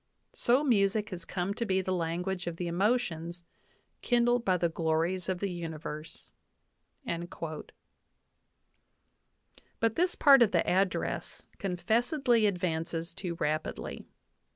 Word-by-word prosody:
So 250 Hz, +4 st, +2 dB
music 210 Hz, -5 st, +2 dB
has 180 Hz, -1 st, -6 dB
come 185 Hz, +1 st, -2 dB
to 235 Hz, -, -3 dB
be 190 Hz, -4 st, +1 dB
the 185 Hz, 0 st, -2 dB
lan 170 Hz, 0 st, -1 dB
guage 185 Hz, -2 st, -3 dB
of 170 Hz, -, -2 dB
the 180 Hz, -, -3 dB
emotions 175 Hz, -3 st, 0 dB, 0.6 s
kindled 240 Hz, 0 st, +2 dB
by 185 Hz, -4 st, +2 dB
the 175 Hz, -, +2 dB
glories 165 Hz, +3 st, 0 dB
of 185 Hz, -, 0 dB
the 200 Hz, +2 st, -2 dB
universe/' 155 Hz, -1 st, -7 dB, 0.8 s
But 165 Hz, -2 st, -5 dB, 2.2 s
this 360 Hz, +1 st, +1 dB
part 275 Hz, -3 st, +7 dB
of 230 Hz, -, +5 dB
the 170 Hz, -, +2 dB
address 190 Hz, +1 st, -1 dB
confessedly 230 Hz, -, +2 dB
advances 170 Hz, -2 st, -2 dB
too 175 Hz, -3 st, -4 dB
rapidly. 155 Hz, -1 st, -3 dB
185 Hz, 120 wpm, -30 LUFS, 170-220 Hz, 2.2 s, part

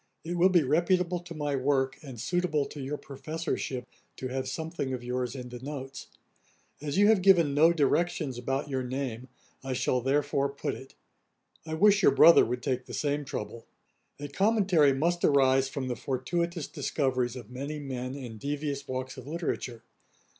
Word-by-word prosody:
It 175 Hz, +2 st, -4 dB
will 175 Hz, +2 st, +5 dB
be 175 Hz, -4 st, +4 dB
reputable 175 Hz, +5 st, +2 dB
to 170 Hz, -1 st, -10 dB
my 145 Hz, -2 st, -1 dB
work, 135 Hz, 0 st, +1 dB
and 130 Hz, -6 st, -9 dB
suitable 155 Hz, +2 st, 0 dB
to 145 Hz, -, -8 dB
your 140 Hz, +3 st, -3 dB
professorship, 145 Hz, -3 st, -4 dB, 0.3 s
to 130 Hz, -, -4 dB
have 130 Hz, +1 st, -3 dB
something 160 Hz, -5 st, -3 dB
of 120 Hz, -, -8 dB
yours 125 Hz, 0 st, -2 dB
in 125 Hz, -2 st, -7 dB
the 125 Hz, 0 st, -8 dB
notes. 135 Hz, -1 st, -7 dB, 0.7 s
As 145 Hz, +1 st, -3 dB
you 205 Hz, -, +6 dB
have 220 Hz, -4 st, +4 dB
given 175 Hz, -6 st, +5 dB
no 160 Hz, +4 st, +6 dB
directions 155 Hz, -3 st, 0 dB
about 135 Hz, +4 st, -2 dB
your 135 Hz, -2 st, -2 dB
name, 130 Hz, -1 st, -4 dB, 0.4 s
I 135 Hz, -1 st, -3 dB
shall 125 Hz, 0 st, 0 dB
therefore 140 Hz, +1 st, +1 dB
put 140 Hz, 0 st, -3 dB
it. 135 Hz, -, -11 dB, 0.7 s
I 160 Hz, -, -2 dB
wish 205 Hz, +3 st, +5 dB
your -, -, +5 dB
brother 170 Hz, +1 st, +8 dB
would 125 Hz, +1 st, -3 dB
take 130 Hz, -1 st, -1 dB
the -, -, -6 dB
same 145 Hz, 0 st, -1 dB
trouble. 115 Hz, -2 st, -6 dB, 0.5 s
A 145 Hz, -, -5 dB
commentary 190 Hz, -3 st, +3 dB
must 170 Hz, +6 st, 0 dB
arise 135 Hz, -1 st, +4 dB
from 135 Hz, -1 st, -4 dB
the 125 Hz, -, -2 dB
fortuitous 165 Hz, -, -2 dB
discoveries 130 Hz, -4 st, -1 dB
of 120 Hz, -3 st, -9 dB
many 140 Hz, +4 st, -5 dB
men 130 Hz, -2 st, -5 dB
in 120 Hz, -6 st, -8 dB
devious 145 Hz, +1 st, -3 dB
walks 130 Hz, +1 st, -4 dB
of 130 Hz, 0 st, -10 dB
literature. 150 Hz, -7 st, -4 dB
140 Hz, 175 wpm, -29 LUFS, 130-160 Hz, 0.7 s, brother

